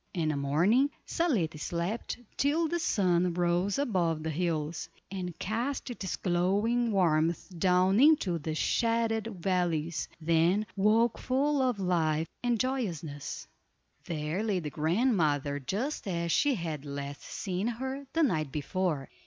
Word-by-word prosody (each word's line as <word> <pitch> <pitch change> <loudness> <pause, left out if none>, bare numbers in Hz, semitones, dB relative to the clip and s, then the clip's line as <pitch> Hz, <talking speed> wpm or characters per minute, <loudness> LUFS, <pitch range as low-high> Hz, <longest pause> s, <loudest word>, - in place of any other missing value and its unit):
In 160 -3 0
the 155 - 0
morning, 170 - +3 0.2
Zaletta 200 - 0
slept 175 +8 -3 0.2
till 310 +4 +2
the 345 +2 -1
sun 180 - +2
rose 175 +3 +1
above 175 - 0
the 160 - -2
hills, 160 -1 -2 0.2
and 180 -3 -5
cast 245 +5 -2
its 195 -6 -4
glowing 205 +7 +1
warmth 165 -4 +2
down 185 +3 +4
into 275 - +4
the 155 +1 -3
shaded 230 +3 +1
valleys, 175 -5 -1
then 170 +5 +2
woke 220 +4 +3
full 280 +2 +1
of 250 -5 +1
life 165 -4 +1
and 240 -2 +1
joyousness. 175 - -3 0.6
There 155 +3 -2
lay 215 -3 0
the 150 -4 -5
grandmother 155 - +1
just 215 - -3
as 170 -2 -1
she 285 - +3
had 160 -7 -4
last 140 0 -6
seen 190 +1 -3
her 265 +4 -4
the 330 - +3
night 155 - +1
before. 155 -1 -1
180 Hz, 135 wpm, -30 LUFS, 160-230 Hz, 0.6 s, down